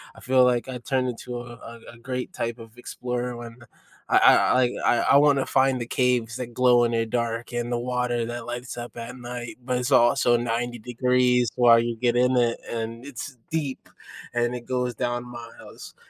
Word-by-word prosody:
I - - -14
feel 130 0 +4
like 125 0 +1
I 130 - -4
turned 130 +1 -1
into 120 0 -6
a 115 -1 -11
a 120 - -16
great 125 +1 -5
type 115 +1 -4
of 115 +1 -13
explorer 125 0 -4
when 120 -1 -9 0.5
I - - +3
I 130 0 +5
I 125 - +2 0.2
I - - +4 0.2
I - - +7
wanna 140 -2 +4
find 130 -1 +2
the 120 - -4
caves 125 -2 0
that 120 -2 -6
glow 125 -1 +4
in 120 - +1
the 115 -1 0
dark 115 0 -2
and 120 0 -2
the 120 - 0
water 125 -1 -1
that 120 0 -6
lights 120 +1 -6
up 120 0 -7
at 120 +2 -7
night, 120 -1 -7
but 125 -1 0
it's 125 +2 -2
also 120 -1 +4
90 120 +1 -2
degrees 125 +1 +1
while 120 -2 +6
you 120 0 -1
get 120 +1 0
in 125 +1 +3
it, 120 -1 +1
and 115 +1 -5
it's 140 0 -8
deep, 150 -5 -4 0.4
and 120 0 0
it 120 -1 -8
goes 125 -1 -1
down 120 +1 -2
miles, 120 -1 -11
120 Hz, 200 wpm, -25 LUFS, 120-125 Hz, 0.5 s, I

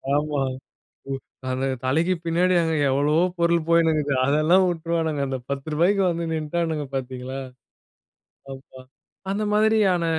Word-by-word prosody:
ஆமா. 150 -1 0 1.1
அந்த 130 +1 -1 0.2
தலைக்கு 160 +8 +2
பின்னாடி 175 +2 +2
அங்க 160 -1 0 0.2
எவ்வளவோ 150 +5 +2 0.2
பொருள் 170 -1 +2
போயிட்டு 165 -1 +4
இருக்கு. 145 -2 0
அதெல்லாம் 155 +7 +4
வுட்டுருவானுங்க. 165 -3 -1
அந்த 130 -1 -3
10 140 +2 -4
ரூபாய்க்கு 190 +6 +2
வந்து 170 0 -2
நின்டானுங்க 160 -1 -2
பார்த்தீங்களா? 130 0 -5 1.2
அப்பா! 130 0 -14 0.5
அந்த 205 +2 -1
மாதிரியான 210 -5 +3
160 Hz, 120 wpm, -23 LUFS, 140-170 Hz, 1.2 s, போயிட்டு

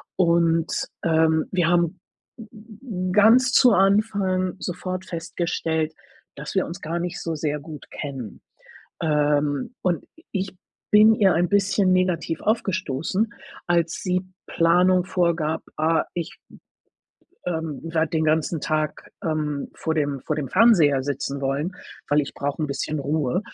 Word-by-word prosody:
Und, 170 -2 +2 0.2
ähm, 160 -1 +3
wir 175 -3 +2
haben, 175 +1 +1 0.4
hm, 215 -4 -7
ganz 225 +6 +5
zu 250 -3 +6
Anfang 195 -2 +2
sofort 185 0 -5
festgestellt, 165 -2 -2 0.4
dass 150 +5 -8
wir 190 - +2
uns 175 +4 -8
gar 165 +2 -3
nicht 175 0 -4
so 165 -1 -3
sehr 150 0 -2
gut 150 0 -11
kennen, 135 -7 -7 0.6
ähm, 150 - +1
und 175 -2 0 0.3
ich 190 -2 -3 0.3
bin 215 +1 +7
ihr 195 -5 +4
ein 175 +2 +2
bisschen 200 -1 +3
negativ 180 -3 0
aufgestoßen, 195 - -1 0.3
als 170 -1 +2
sie 185 -1 0 0.2
Planung 180 +2 +3
vorgab: 170 -3 0 0.2
„Äh, 160 +1 +2
ich, 170 -2 -5
hm, - - -15 0.9
ähm, 160 -5 -3
werde 165 -1 0
den 160 -1 0
ganzen 155 +1 +1
Tag, 155 0 -2
ähm, 150 -3 -2
vor 160 - -2
dem 145 -3 -1
vor 155 - -2
dem 145 -4 -3
Fernseher 170 - +5
sitzen 140 0 -3
wollen, 140 +6 -1 0.4
weil 150 +1 +4
ich 140 - -6
brauche 145 +2 -3
'n - - 0
bisschen 145 +2 -3
Ruhe” 145 +3 0
165 Hz, 140 wpm, -23 LUFS, 155-185 Hz, 0.9 s, bin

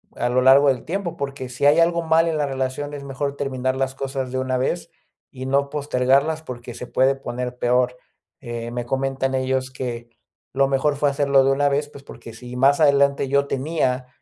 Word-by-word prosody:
a 120 - -1
lo 130 +1 +2
largo 135 +2 +6
del 130 -3 -1
tiempo, 185 0 -3
porque 140 -2 -5
sí 125 +3 -2
hay 150 +3 +6
algo 170 0 +2
mal 165 +1 +3
en 155 - -1
la 145 - +1
relación, 135 +2 -3
es 140 -1 -7
mejor 140 +1 -4
terminar 130 -2 -2
las 135 0 -2
cosas 135 -2 -4
de 130 - -2
una 130 0 -1
vez 170 +6 -2 0.4
y 130 -2 -8
no 140 +1 +1
postergarlas 140 +2 +1
porque 125 -5 -8
se 125 - -8
puede 135 +1 +2
poner 125 -1 -5
peor. 125 +1 +1 0.4
Eh, 120 -2 -6
me 120 0 -4
comentan 135 +1 -1
ellos 130 0 -1
que 120 -2 -6 0.4
lo 135 0 +3
mejor 140 +2 +1
fue 145 0 +2
hacerlo 140 -1 +3
de 135 - +3
una 145 +1 +2
vez, 145 +1 -1
pues 140 -2 -13
porque 115 - -11
si 125 +2 -10
más 140 +4 +4
adelante 140 -1 +3
yo 140 0 +2
tenía 130 -3 -1
135 Hz, 205 wpm, -22 LUFS, 130-140 Hz, 0.4 s, largo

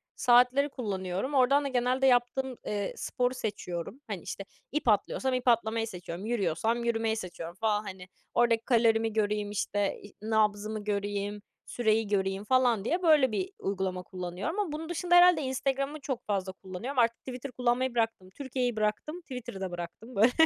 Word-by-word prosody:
saatleri 250 +3 +4
kullanıyorum. 200 0 -3
Oradan 275 +2 +4
da - - -1
genelde 255 +1 +2
yaptığım, 250 +1 +2
eee, 205 -1 -2
sporu 250 0 -1
seçiyorum. 210 - -5
Hani, 200 -6 -4
işte, 195 - -6 0.3
ip 300 -3 -2
atlıyorsam 255 +4 +2
ip 255 0 -2
atlamayı 225 -1 +2
seçiyorum, 180 0 -7
yürüyorsam 225 +1 0
yürümeyi 225 -1 +1
seçiyorum 175 -4 -6
falan, 210 0 0
hani, 185 -3 -8 0.3
oradaki 230 -1 +3
kalorimi 225 -2 +3
göreyim, 210 -1 0
işte, 205 -1 -1
i 205 - -13
nabzımı 215 -1 0
göreyim, 205 0 -2 0.2
süreyi 220 -2 +1
göreyim 195 -1 0
falan 245 -4 +3
diye, 350 +7 0
böyle, 300 -7 +5
bir 370 - -2
uygulama 190 -2 -2
kullanıyorum 185 - -4
ama 395 -7 -1
bunun 315 +2 -5
dışında 350 +1 +1
herhâlde 350 -2 +7
Instagram'ı 275 +2 -1
çok 265 -3 -4
fazla 195 -2 -1
kullanıyorum. 190 +8 -5
Artık 235 -1 +3
Twitter 255 +1 -7
kullanmayı 250 +1 0
bıraktım. 225 -5 -1
Türkiye'yi 250 +1 -2
bıraktım, 215 +11 -2
Twitter'ı 250 - -7
da 190 -2 -3
bıraktım. 175 +8 -7
Böyle, 225 +5 +5
225 Hz, 160 wpm, -29 LUFS, 205-255 Hz, 0.3 s, herhâlde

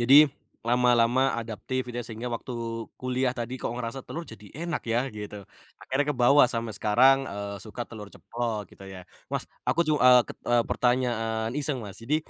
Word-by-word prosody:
Jadi, 125 +4 +5 0.5
lama-lama 120 0 +3 0.2
adaptif, 115 +3 -4
gitu 120 - -6
ya 120 - -4
sehingga 115 +2 -5
waktu 125 - -9 0.5
kuliah 130 0 0
tadi 120 +1 -4
kok - - -2
ngerasa 120 +2 -4
telur 170 +1 -6
jadi 105 -1 -12 0.2
enak 170 -3 -2
ya, 120 - +3 0.2
gitu. 105 0 -7 0.4
Akhirnya 135 +3 0
kebawa 135 +2 +5
sampe 115 -1 -2
sekarang, 125 +7 +5
eee, 100 0 -5
suka 115 +2 -6
telur 105 -3 -9
ceplok, 115 -3 -3
gitu 95 - -14
ya. 90 - -8 0.3
Mas, - - 0 0.2
aku 140 +7 +2
ju 155 - +4
eee, 125 -2 +7
ket - - -7
eee, 120 -1 +4
pertanyaan 115 -3 0
iseng, 145 -2 +3
Mas, 100 -2 -7
jadi, 145 +7 +1
120 Hz, 175 wpm, -27 LUFS, 110-130 Hz, 0.5 s, eee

